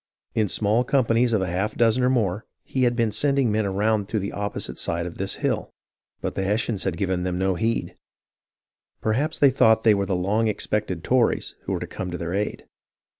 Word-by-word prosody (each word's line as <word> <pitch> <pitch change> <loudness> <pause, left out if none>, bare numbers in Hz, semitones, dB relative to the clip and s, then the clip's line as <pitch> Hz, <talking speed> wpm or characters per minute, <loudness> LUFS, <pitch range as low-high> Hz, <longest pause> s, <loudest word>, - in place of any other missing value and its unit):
In 110 -2 +1
small 110 +5 +2
companies 120 -2 +2
of 105 -4 +2
a - - -2
half 95 +5 -2
dozen 115 +1 +3
or 125 - +4
more, 110 -5 0 0.2
he 130 -1 0
had 120 0 +2
been 115 -2 +1
sending 135 +2 +2
men 105 -1 +1
around 105 +1 0
to 110 - -1
the 100 -1 -2
opposite 100 0 -4
side 85 0 -1
of 90 - -8
this 95 0 -1
hill; - - -1 0.5
but - - -3
the - - -2
Hessians 105 +1 0
had 90 -3 -1
given 95 0 -1
them 90 0 -2
no 95 +1 +1
heed. 115 +6 -1 1.1
Perhaps 140 +9 0
they 140 -2 +5
thought 110 -4 +4
they 110 - +6
were 100 -1 0
the 95 - 0
long 105 +5 +1
expected 105 -4 -2
Tories 125 +1 +1
who - - -2
were - - -1
to - - -4
come 95 - -6
to 90 - -4
their 85 +1 -4
aid. 105 +2 -2
105 Hz, 210 wpm, -24 LUFS, 95-115 Hz, 1.1 s, they